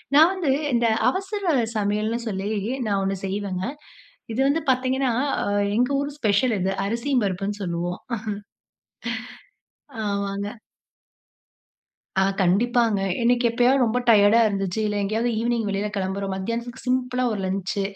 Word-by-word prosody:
நான் 320 Hz, +5 st, +7 dB
வந்து 350 Hz, -8 st, 0 dB, 0.2 s
இந்த 235 Hz, -1 st, +3 dB, 0.2 s
அவசர 385 Hz, -3 st, -1 dB, 0.2 s
சமையல்ன்னு 215 Hz, +3 st, 0 dB
சொல்லி 200 Hz, 0 st, -2 dB, 0.4 s
நான் 200 Hz, -1 st, +1 dB
ஒண்ணு 195 Hz, 0 st, -1 dB
செய்வேங்க. 190 Hz, -1 st, -3 dB, 0.7 s
இது 230 Hz, -, -3 dB
வந்து 310 Hz, +4 st, +1 dB
பாத்தீங்கன்னா, 260 Hz, 0 st, +1 dB, 0.6 s
எங்க 250 Hz, +2 st, +3 dB
ஊர் 285 Hz, +1 st, -2 dB
ஸ்பெஷல்ங்க, 210 Hz, -2 st, +2 dB
இது 195 Hz, -, +1 dB
அரிசி 235 Hz, +6 st, -2 dB
பருப்புன்னு 200 Hz, +2 st, -2 dB
சொல்லுவோம். 175 Hz, 0 st, -3 dB, 2.1 s
ஆமாங்க. 200 Hz, 0 st, -2 dB, 1.7 s
ஆ -, -, +4 dB, 0.2 s
கண்டிப்பாங்க, 225 Hz, +3 st, +2 dB, 0.2 s
எனக்கு 240 Hz, +1 st, +3 dB
எப்பயாவது 250 Hz, +3 st, +3 dB
ரொம்ப 235 Hz, +3 st, +1 dB
டயர்டா 205 Hz, +1 st, +6 dB
இருந்துச்சு, 195 Hz, 0 st, -2 dB
இல்ல 210 Hz, -, -1 dB
எங்கயாவது 220 Hz, +4 st, 0 dB
ஈவ்னிங் 235 Hz, -1 st, 0 dB
வெளியில 200 Hz, +1 st, -1 dB
கிளம்புறோம். 195 Hz, 0 st, -2 dB
மத்தியானத்துக்கு 235 Hz, +5 st, -4 dB
சி -, -, -16 dB
சிம்பிளா 255 Hz, 0 st, 0 dB
ஒரு 205 Hz, -, -3 dB
லன்ச்சு, 195 Hz, +1 st, -2 dB
215 Hz, 125 wpm, -24 LUFS, 195-250 Hz, 2.1 s, நான்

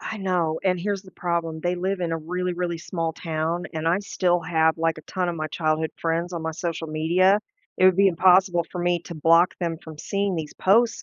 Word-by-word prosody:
I 220 Hz, -, -5 dB
know. 180 Hz, -5 st, -1 dB
And, 180 Hz, -2 st, +1 dB
here's 200 Hz, 0 st, -2 dB
the 185 Hz, -, -15 dB
problem. 170 Hz, -3 st, -2 dB
They 175 Hz, +1 st, 0 dB
live 185 Hz, +2 st, -2 dB
in 170 Hz, -2 st, -1 dB
a -, -, 0 dB
really, 180 Hz, +3 st, -3 dB
really 175 Hz, -1 st, -2 dB
small 165 Hz, -1 st, -3 dB
town, 165 Hz, +1 st, -3 dB
and 160 Hz, +1 st, -3 dB
I 175 Hz, +3 st, +3 dB
still 180 Hz, -3 st, 0 dB
have, 160 Hz, -1 st, +1 dB
like, 165 Hz, -1 st, +1 dB
a -, -, -11 dB
ton 180 Hz, +3 st, -2 dB
of 170 Hz, -, -2 dB
my 155 Hz, 0 st, -2 dB
childhood 155 Hz, 0 st, -1 dB
friends 170 Hz, +2 st, -1 dB
on 170 Hz, -, -3 dB
my 160 Hz, -, -2 dB
social 165 Hz, -1 st, -4 dB
media. 175 Hz, +6 st, +3 dB, 0.4 s
It'd 185 Hz, -1 st, +5 dB
be 195 Hz, 0 st, +5 dB
impossible 180 Hz, 0 st, +4 dB
for 180 Hz, -, -5 dB
me 175 Hz, 0 st, +1 dB
to 170 Hz, -, -8 dB
block 165 Hz, +3 st, +4 dB
them 165 Hz, -2 st, -1 dB
from 160 Hz, -3 st, -11 dB
seeing 200 Hz, +3 st, -1 dB
these 155 Hz, -2 st, -5 dB
posts, 225 Hz, +4 st, +3 dB
175 Hz, 225 wpm, -24 LUFS, 160-185 Hz, 0.4 s, It'd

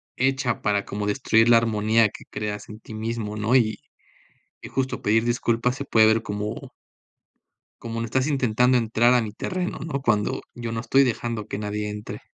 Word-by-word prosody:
hecha 130 Hz, -2 st, 0 dB
para 100 Hz, -1 st, 0 dB
como 105 Hz, 0 st, -4 dB
destruir 115 Hz, +1 st, +3 dB
la 115 Hz, -, +8 dB
armonía 110 Hz, -1 st, +2 dB
que -, -, -12 dB
creas 105 Hz, -1 st, -5 dB
en 105 Hz, +1 st, -9 dB
ti 110 Hz, -, -12 dB
mismo, 110 Hz, -1 st, -4 dB
¿no?, 110 Hz, +4 st, +1 dB
y 110 Hz, -4 st, +2 dB, 0.8 s
y -, -, -9 dB
justo 130 Hz, -1 st, -2 dB
pedir 110 Hz, +2 st, +2 dB
disculpas 120 Hz, +1 st, 0 dB
se 140 Hz, -, -5 dB
puede 110 Hz, -4 st, +5 dB
ver 110 Hz, +1 st, +3 dB
como 105 Hz, +2 st, -5 dB, 1.1 s
como 115 Hz, 0 st, -5 dB
no 115 Hz, -, -2 dB
estás 130 Hz, +4 st, 0 dB
intentando 125 Hz, -3 st, +2 dB
entrar 120 Hz, +1 st, +3 dB
a 120 Hz, -, +3 dB
mi 105 Hz, -, -5 dB
terreno, 180 Hz, -, -4 dB
¿no?, 150 Hz, -4 st, -4 dB
cuando 105 Hz, -4 st, +1 dB
yo 120 Hz, -1 st, -5 dB
no 115 Hz, 0 st, -3 dB
estoy 135 Hz, +2 st, +4 dB
dejando 115 Hz, -3 st, -2 dB
que 100 Hz, -, -4 dB
nadie 105 Hz, 0 st, -3 dB
entre. 105 Hz, 0 st, -7 dB
115 Hz, 185 wpm, -24 LUFS, 105-125 Hz, 1.1 s, la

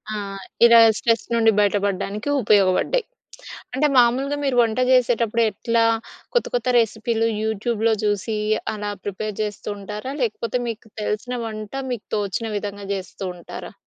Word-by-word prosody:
ఆ! -, -, -2 dB, 0.5 s
ఇలా 235 Hz, 0 st, +8 dB, 0.2 s
స్ట్రెస్ 230 Hz, -1 st, +1 dB
నుండి 225 Hz, -1 st, +4 dB
బయటపడ్డానికి 205 Hz, +3 st, 0 dB
ఉపయోగపడ్డాయి. 205 Hz, -, +3 dB, 0.7 s
అంటే, 285 Hz, +4 st, +2 dB
మామూలుగా 255 Hz, +4 st, +3 dB
మీరు 270 Hz, -3 st, 0 dB
వంట 225 Hz, 0 st, -1 dB
చేసేటప్పుడు, 235 Hz, -2 st, +3 dB
ఎట్లా 230 Hz, +3 st, +1 dB, 0.5 s
కొత్త 485 Hz, -, +2 dB
కొత్త 245 Hz, 0 st, 0 dB
రెసిపీలు 225 Hz, 0 st, +1 dB
యూట్యూబ్‌లో 220 Hz, +1 st, 0 dB
చూసి, 210 Hz, +1 st, 0 dB, 0.4 s
అలా 210 Hz, -1 st, -4 dB
ప్రిపేర్ 205 Hz, +1 st, -4 dB
చేస్తూ 210 Hz, -2 st, -5 dB
ఉంటారా? 210 Hz, +6 st, -6 dB
లేకపోతే 230 Hz, +1 st, -1 dB
మీకు 225 Hz, -1 st, -6 dB
తెలిసిన 215 Hz, +4 st, -2 dB
వంట 215 Hz, -2 st, -7 dB, 0.2 s
మీకు 235 Hz, -4 st, -6 dB
తోచిన 205 Hz, +2 st, -2 dB
విధంగా 205 Hz, -1 st, -5 dB
చేస్తూ 190 Hz, 0 st, -7 dB
ఉంటారా? 175 Hz, -, -9 dB
220 Hz, 130 wpm, -22 LUFS, 205-235 Hz, 0.7 s, ఇలా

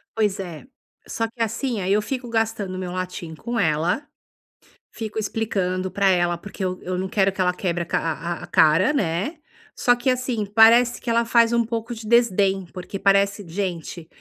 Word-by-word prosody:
Pois 210 Hz, -3 st, +1 dB
é, 175 Hz, +2 st, -7 dB, 0.4 s
só 230 Hz, -, -2 dB
que 230 Hz, +1 st, -10 dB
assim, 230 Hz, +1 st, -1 dB
aí 190 Hz, +2 st, +1 dB
eu 210 Hz, -, +3 dB
fico 245 Hz, +3 st, -4 dB
gastando 225 Hz, -4 st, -1 dB
meu 185 Hz, -1 st, -4 dB
latim 180 Hz, -2 st, -5 dB
com 235 Hz, +9 st, -5 dB
ela, 170 Hz, -, +1 dB, 0.9 s
fico 220 Hz, -1 st, -6 dB
explicando 195 Hz, -4 st, -1 dB
pra 195 Hz, +1 st, +2 dB
ela, 175 Hz, -2 st, +2 dB
porque 200 Hz, +1 st, -8 dB
eu 185 Hz, 0 st, -2 dB
eu 180 Hz, 0 st, -3 dB
não 190 Hz, +1 st, -3 dB
quero 195 Hz, -1 st, +2 dB
que 190 Hz, -, -3 dB
ela 180 Hz, -1 st, +2 dB
quebre 175 Hz, -2 st, -2 dB
a -, -, -9 dB
ca -, -, 0 dB
a 165 Hz, +1 st, -3 dB
a -, -, -8 dB
cara, 165 Hz, -, +4 dB
né, 205 Hz, -, -1 dB, 0.4 s
só 245 Hz, -, +3 dB
que 245 Hz, +2 st, +1 dB
assim, 250 Hz, -4 st, -1 dB
parece 230 Hz, +4 st, +5 dB
que 245 Hz, -, -5 dB
ela 230 Hz, 0 st, +2 dB
faz 235 Hz, 0 st, +4 dB
um 235 Hz, -1 st, +2 dB
pouco 230 Hz, +1 st, -4 dB
de 220 Hz, -1 st, -9 dB
desdém, 200 Hz, -5 st, +3 dB
porque 185 Hz, +1 st, -7 dB
parece: 200 Hz, +1 st, +2 dB
"Gente, 170 Hz, -2 st, -4 dB
200 Hz, 190 wpm, -23 LUFS, 180-230 Hz, 0.9 s, parece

